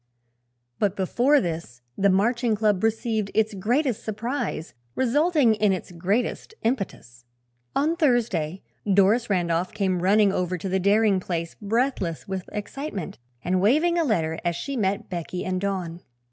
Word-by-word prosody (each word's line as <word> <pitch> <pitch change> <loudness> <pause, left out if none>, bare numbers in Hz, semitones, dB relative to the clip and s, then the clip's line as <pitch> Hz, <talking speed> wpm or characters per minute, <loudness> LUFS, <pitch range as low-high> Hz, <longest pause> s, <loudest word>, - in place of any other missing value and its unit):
But 205 -2 +1
before 245 +10 +3
this 160 - -5
the 200 0 +3
Marching 230 +4 +2
Club 210 -2 +1
received 220 -2 0
its 220 0 +2
greatest 235 +4 0
surprise, 220 - -3 0.2
resulting 285 0 +3
in 210 -1 +2
its 185 - -5
greatest 200 - -2
impetus. 195 - -3 0.5
On 310 +4 +2
Thursday 225 - +1 0.3
Doris 205 +5 +4
Randolph 175 -1 0
came 190 -4 0
running 200 +2 +4
over 180 0 -1
to 185 - -5
the 190 0 0
Daring 200 +1 +3
place 170 -2 -4
breathless 210 - -1
with 190 -1 -5
excitement 210 - -5 0.2
and 180 +1 +1
waving 310 - +3
a - - +3
letter 165 - 0
as 175 -1 0
she 275 +10 -4
met 205 -1 -1
Becky 180 0 -4
and 185 0 -1
Don. 180 -4 -3
200 Hz, 145 wpm, -25 LUFS, 180-235 Hz, 0.5 s, Doris